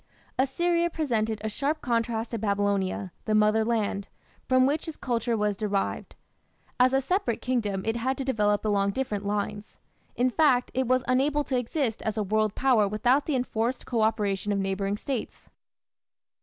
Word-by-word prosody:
Assyria 340 +6 +2
presented 225 -9 -1
a - - -1
sharp 285 +8 -1
contrast 230 -2 -1
to 230 - -2
Babylonia, 200 -2 0
the 215 - +1
mother 215 +1 +4
land, 215 -3 -1 0.4
from 255 0 +4
which 295 +5 0
its 320 - -6
culture 235 -2 -1
was 210 -1 0
derived. 200 -1 -2 0.6
As 250 +1 +5
a 270 - +3
separate 275 - 0
kingdom 210 -7 -1
it 225 +1 0
had 260 +3 -1
to 270 - -3
develop 210 -5 +1
along 200 -1 +1
different 210 -6 -2
lines. 205 0 -3 0.4
In 250 +1 +2
fact, 255 -4 +3
it 260 -1 0
was 255 0 +2
unable 275 +4 +2
to 270 - -2
exist 245 -1 -1
as 220 0 -2
a 215 - +1
world 215 +1 0
power 245 -6 +3
without 240 +7 +2
the 300 - +1
enforced 245 0 -1
co 235 -3 -1
operation 210 -2 0
of 200 - +1
neighbouring 195 +1 -1
States. 255 +1 -5
225 Hz, 170 wpm, -27 LUFS, 210-260 Hz, 0.6 s, As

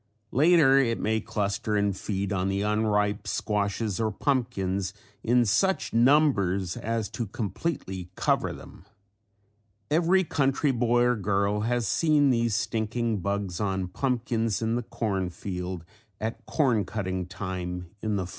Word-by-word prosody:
Later 145 -2 +5
it 115 -4 +1
may 110 +1 0
cluster 105 +1 -2
and 100 -1 +1
feed 100 0 -3
on 95 0 0
the 100 +1 0
unripe 105 -1 +1
squashes 105 0 -1
or 110 -1 +1
pumpkins 100 -7 -1 0.3
in 120 +1 +3
such 185 - +1
numbers 115 - +3
as 115 -2 -2
to 115 - -4
completely 95 - -4
cover - - +1
them. 90 - -12 1.1
Every 175 +4 +4
country 140 -2 +1
boy 120 -1 +2
or 125 0 +3
girl 100 0 0
has 120 +1 0
seen 150 - +3
these 115 -3 +1
stinking 110 0 -1
bugs 100 -2 -2
on 95 -3 -1
pumpkins 115 0 -1
in 115 0 0
the 120 - 0
corn 100 -5 -2
field, 90 -1 -5 0.3
at 115 +1 -5
corn 125 -9 +2
cutting 95 -3 -3
time 90 -2 -5
in 110 -1 -1
the 95 -2 -1
fall. - - -10
105 Hz, 140 wpm, -27 LUFS, 95-120 Hz, 1.1 s, Later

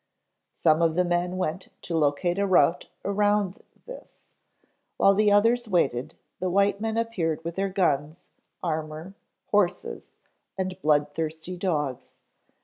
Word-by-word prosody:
Some 160 0 +3
of 165 -1 +2
the 180 0 +2
men 175 +1 0
went 185 0 -3 0.2
to 170 - -3
locate 160 +4 +1
a 200 - +1
route 175 -3 +3 0.2
around 205 -1 +1 0.2
this. - - -12 0.8
While 195 - +5
the 210 +1 +3
others 230 +4 +3
waited, 155 - 0 0.2
the 185 - -1
white 200 +2 +2
men 225 0 -1
appeared 175 -9 -1
with 170 0 -5
their 195 0 -1
guns, 155 -4 0 0.4
armor, 160 +1 -4 0.4
horses 200 -3 0 0.5
and 185 0 -3
blood 145 -1 +2
thirsty 160 +3 -4
dogs. 150 -8 -3
180 Hz, 135 wpm, -26 LUFS, 155-200 Hz, 0.8 s, While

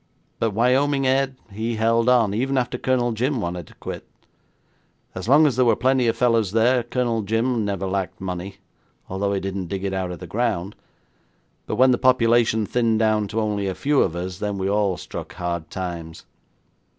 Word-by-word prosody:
But 115 - +1
Wyoming 135 +6 +2
Ed, 135 0 +1 0.2
he 110 +3 -3
held 115 +2 +2
on, 115 -5 +3
even 135 +5 0
after 125 -1 -1
Colonel 125 -2 +1
Jim 125 +4 -1
wanted 85 -4 -4
to - - -17
quit. - - -7 1.1
As 95 +4 -5
long 150 +3 +6
as 135 -5 +1
there 130 - +4
were 115 -2 +4
plenty 130 +1 +2
of 115 0 +1
fellows 115 -5 +2
there, 120 +3 +3
Colonel 120 -1 -1
Jim 115 +3 0
never 100 -2 -2
lacked 95 -1 -3
money, 95 +1 -5 0.5
although 100 +2 -1
he 100 - 0
didn't 95 -1 -4
dig 95 +2 -4
it 100 -1 -2
out 95 -1 -2
of 90 - -6
the 90 - -9
ground, 105 -1 -2 0.9
but - - -2
when 130 +1 +5
the 125 - +1
population 120 -3 +3
thinned 115 0 +1
down 110 -1 +2
to 110 +2 -2
only 105 -2 -1
a 95 - -2
few 145 0 +2
of 85 - 0
us, 90 +1 -5
then 105 -1 -2
we 95 0 -2
all 100 -2 +1
struck - - -8
hard 85 -2 -4
times. 85 -3 -6
110 Hz, 190 wpm, -23 LUFS, 95-125 Hz, 1.1 s, long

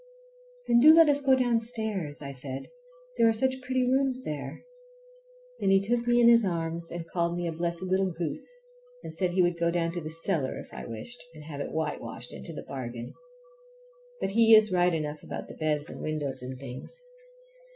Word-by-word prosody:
"Then 235 - +4
do 310 +5 +9
let 330 -2 +7
us 285 0 +2
go 270 -1 +5
downstairs," 225 - -1
I 140 - -5
said, 135 0 -5 0.5
"there 230 - +6
are - - +5
such 260 +3 0
pretty 255 0 0
rooms 260 0 +1
there." 145 - -6 0.9
Then - - +1
he 195 0 +6
took 235 +4 -1
me 240 0 +4
in 235 - +6
his 235 -1 +7
arms 165 -2 -2
and 170 -1 -6
called 170 0 -1
me 175 - -2
a 170 - -1
blessed 170 +2 -3
little 190 +1 +1
goose, 165 - -4 0.5
and - - -7
said 180 +1 +1
he 180 +1 +2
would 175 -1 0
go 170 0 +2
down 170 -1 0 0.2
cellar 165 -4 -1
if - - -10
I - - -7
wished, 140 - -6
and 155 - -11
have 145 -2 -6
it - - -4
whitewashed 125 -7 -4
into - - -8
the 155 - -7
bargain. 120 -3 -6 1.1
But - - -1
he 225 +1 +7
is 215 -1 +5
right 180 0 +3
enough 150 -1 -4
about - - -7
the - - -9
beds 150 -1 -1
and - - -9
windows 145 -4 -2
and 130 +1 -6
things. 130 - -8
175 Hz, 195 wpm, -28 LUFS, 150-230 Hz, 1.1 s, do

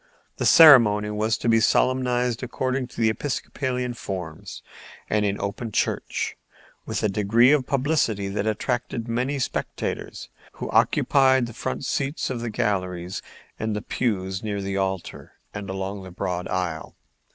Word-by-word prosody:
The - - +1
ceremony 115 -10 +7
was 110 +2 0
to - - -4
be 115 -1 +5
solemnized 125 0 +1
according 130 +1 -2
to 120 - -12
the 110 -1 +4
Episcopalian 125 -1 -3
forms 90 -8 -7 0.5
and 105 0 +2
in 100 0 -1
open 105 +3 -4
church, - - -1 0.5
with - - -2
a - - +4
degree 105 +5 +4
of 140 -4 +2
publicity 135 -8 +1
that 100 +2 -2
attracted 115 +1 -2
many 125 +5 -1
spectators, 130 - -4 0.2
who - - -6
occupied 130 -2 +4
the 120 - -8
front 130 - -4
seats 135 +2 -2
of 120 -2 -3
the 120 - -3
galleries 90 -4 -2 0.4
and 110 -1 -2
the 105 - -4
pews 95 -7 -2
near 105 -2 -3
the 100 0 -3
altar 95 -2 -3 0.2
and 100 -2 -6
along 95 +1 -4
the 95 - -9
broad 90 0 -3
aisle. 90 -4 -3
110 Hz, 150 wpm, -24 LUFS, 100-125 Hz, 0.5 s, ceremony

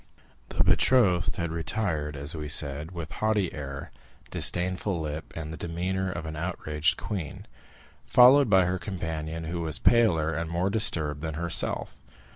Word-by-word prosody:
The - - +1
betrothed 95 -9 +3
had 85 -2 -3
retired, 80 -3 -2
as 70 +3 -4
we 75 -1 -5
said, 75 +1 +1
with 85 -4 -7
haughty 105 -4 0
air, 70 -1 -7 0.4
disdainful 90 +1 +2
lip, 75 0 -5
and 80 -1 -6
the - - -7
demeanor 90 +3 -3
of 85 -2 -6
an 80 0 -6
outraged 75 -2 -1
queen, 90 -4 -6 0.6
followed 130 +1 +6
by 95 -2 +5
her 90 +1 -1
companion, 80 -4 -5
who 85 +1 -4
was 80 -3 0
paler 80 - +3
and 85 -1 -3
more 90 +3 -1
disturbed 80 -9 +1
than 80 -1 -4
herself. 85 +1 -1
85 Hz, 150 wpm, -27 LUFS, 75-95 Hz, 0.6 s, followed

